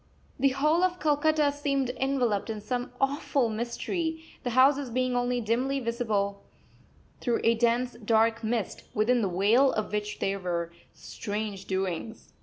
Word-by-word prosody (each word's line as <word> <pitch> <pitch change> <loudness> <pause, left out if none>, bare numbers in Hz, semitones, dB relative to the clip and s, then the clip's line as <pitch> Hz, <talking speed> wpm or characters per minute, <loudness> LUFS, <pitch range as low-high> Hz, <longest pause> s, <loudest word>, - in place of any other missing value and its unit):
The 275 +1 +4
whole 300 +6 +2
of 360 -1 +1
Calcutta 300 0 +2
seemed 275 -3 -1
enveloped 250 -6 0
in 220 -1 -3
some 245 +3 -3
awful 275 -2 +1
mystery, 320 - -3 0.2
the 245 - -1
houses 270 0 +5
being 255 +1 0
only 245 0 +1
dimly 250 +5 0
visible 220 -5 -1 0.8
through 240 -2 0
a 230 - +5
dense, 240 +2 +1
dark 225 +1 +2
mist, 220 -2 -2
within 235 +3 +3
the 200 - 0
veil 215 +9 +4
of 215 - -2
which 210 0 -2
there 195 0 -1
were 170 -2 -2 0.2
strange 210 -2 -5
doings. 190 +2 -4
240 Hz, 145 wpm, -28 LUFS, 215-275 Hz, 0.8 s, houses